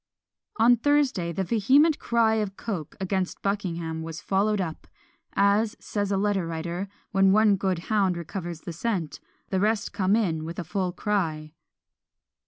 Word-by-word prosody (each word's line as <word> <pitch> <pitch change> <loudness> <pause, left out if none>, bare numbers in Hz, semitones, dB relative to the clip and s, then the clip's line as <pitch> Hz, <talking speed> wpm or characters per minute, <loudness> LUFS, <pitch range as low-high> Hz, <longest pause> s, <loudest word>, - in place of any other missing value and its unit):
On 235 +2 +5
Thursday, 265 -10 +1
the 190 +3 -2
vehement 260 - +3
cry 230 -2 +2
of 205 -2 -2
Coke 180 -10 -5
against 190 -1 -2
Buckingham 170 -5 -2
was 165 0 -6
followed 205 +2 +1
up; 165 -4 -4 0.5
as, 205 +2 +2
says 205 -1 -2
a 195 - +2
letter 195 -3 0
writer, 170 +3 -4 0.2
when 195 -2 +4
one 210 0 +5
good 190 -2 0
hound 190 0 +1
recovers 170 -1 -6
the 170 - -6
scent, 175 -3 -2 0.3
the 190 - +1
rest 210 +1 0
come 200 0 +2
in 170 -8 0
with 165 +1 -6
a 180 - -3
full 180 +2 -2
cry. 165 -6 -2
195 Hz, 155 wpm, -26 LUFS, 170-210 Hz, 0.5 s, On